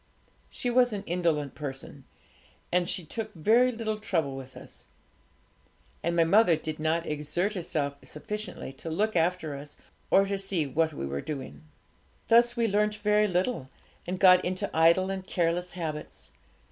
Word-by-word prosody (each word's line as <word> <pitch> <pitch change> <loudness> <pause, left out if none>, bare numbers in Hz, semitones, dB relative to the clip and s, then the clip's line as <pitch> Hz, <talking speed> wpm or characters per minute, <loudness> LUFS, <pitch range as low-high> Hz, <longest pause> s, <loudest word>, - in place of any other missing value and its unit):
She 245 - -2
was 245 -1 +4
an 200 - -4
indolent 165 -5 0
person, 140 -1 -6 0.7
and 180 0 +1
she 180 -3 -2
took 220 +6 -5
very 230 +10 +4
little 220 -2 -3
trouble 160 -10 -1
with 130 -1 -9
us, - - -13 1.1
and 170 +1 -1
my 170 - +5
mother 180 +1 +5
did 155 0 -5
not 160 +2 0
exert 155 +7 -1
herself 150 -6 -2
sufficiently 210 -3 -6
to 165 - -8
look 210 +6 0
after 170 -2 +1
us, 145 +1 -8 0.3
or 195 - +5
to 195 0 -2
see 190 -5 -1
what 160 +4 +1
we 70 - -5
were 70 +1 -3
doing. 130 - -7 0.6
Thus 240 +1 +5
we 230 -1 +2
learnt 210 +1 +1
very 210 0 +2
little, 180 - -1 0.4
and 180 +1 -3
got 185 -1 +7
into 185 +1 -3
idle 170 +4 +4
and 190 -1 -4
careless 175 0 0
habits. 155 -4 -6
175 Hz, 160 wpm, -28 LUFS, 155-210 Hz, 1.1 s, got